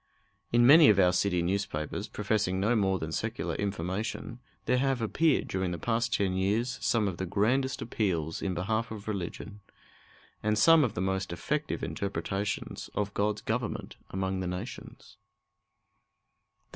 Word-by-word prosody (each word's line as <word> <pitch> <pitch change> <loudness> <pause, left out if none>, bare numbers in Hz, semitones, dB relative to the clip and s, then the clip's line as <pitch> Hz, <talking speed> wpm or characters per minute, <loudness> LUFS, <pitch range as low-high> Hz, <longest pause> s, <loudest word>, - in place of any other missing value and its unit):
In 120 0 +5
many 150 +4 +9
of 105 - +5
our 90 -1 +5
city 90 -1 +1
newspapers, 85 -5 -2
professing 105 -3 -1
no 105 +5 +2
more 95 -3 +2
than 80 -2 -5
secular - - -2
information, 100 +4 -3 0.3
there 125 0 +2
have 135 -1 +1
appeared 145 +7 +2
during 95 -1 -1
the 85 - -3
past 115 +6 0
ten 100 -5 +1
years 105 +7 0
some 110 -3 +2
of 90 -3 -3
the 95 - -2
grandest 130 +8 +1
appeals 85 -9 -1
in 95 -2 -2
behalf 110 +6 -1
of 110 -1 -8
religion, 100 +1 -5 0.8
and 105 0 +1
some 165 +5 +6
of 120 - -1
the - - -2
most 95 -1 -1
effective 150 - -2
interpretations 100 0 -3
of 100 -1 -1
God's 105 +1 0
government 115 +1 -3
among 95 0 -2
the 95 - -2
nations. 105 +3 -7
100 Hz, 150 wpm, -29 LUFS, 95-115 Hz, 0.8 s, many